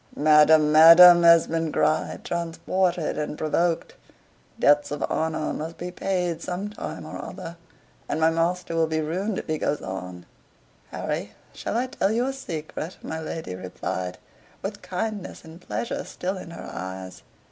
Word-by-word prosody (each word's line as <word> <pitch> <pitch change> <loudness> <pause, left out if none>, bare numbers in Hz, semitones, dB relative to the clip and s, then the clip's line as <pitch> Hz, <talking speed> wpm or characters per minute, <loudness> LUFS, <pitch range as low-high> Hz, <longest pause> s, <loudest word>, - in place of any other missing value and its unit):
"Madam, 150 0 +5
madam!" 170 +3 +9
Esmond 165 -1 +4
cried, 155 +1 0
transported 170 0 -1
and 150 0 -4
provoked. 165 +2 0 0.6
"Debts 145 0 +4
of 145 0 -2
honor 160 -1 -1
must 160 +2 -6
be 180 +1 -5
paid 180 -3 -2
some 190 +4 -4
time 210 - -7
or - - -7
other; 165 - -8 0.5
and - - -1
my 160 0 +4
master 170 +1 -1
will 165 -1 +2
be 160 0 -1
ruined 185 +7 -2
if - - -4
he 155 -1 -2
goes 145 - -1
on." 90 -2 -7 0.6
"Harry, - - -4 0.2
shall 220 - -3
I 245 - +1
tell 205 -6 -1
you 235 +3 +1
a 270 - -2
secret?" 165 - -6
my 160 - -4
lady 160 - -5
replied, 90 0 -5 0.5
with 205 +1 -5
kindness 200 +1 -5
and 160 +2 -13
pleasure 110 -5 -4
still 185 +2 -4
in 185 - -8
her 170 - -9
eyes. 95 +1 -7
165 Hz, 155 wpm, -25 LUFS, 150-180 Hz, 0.6 s, madam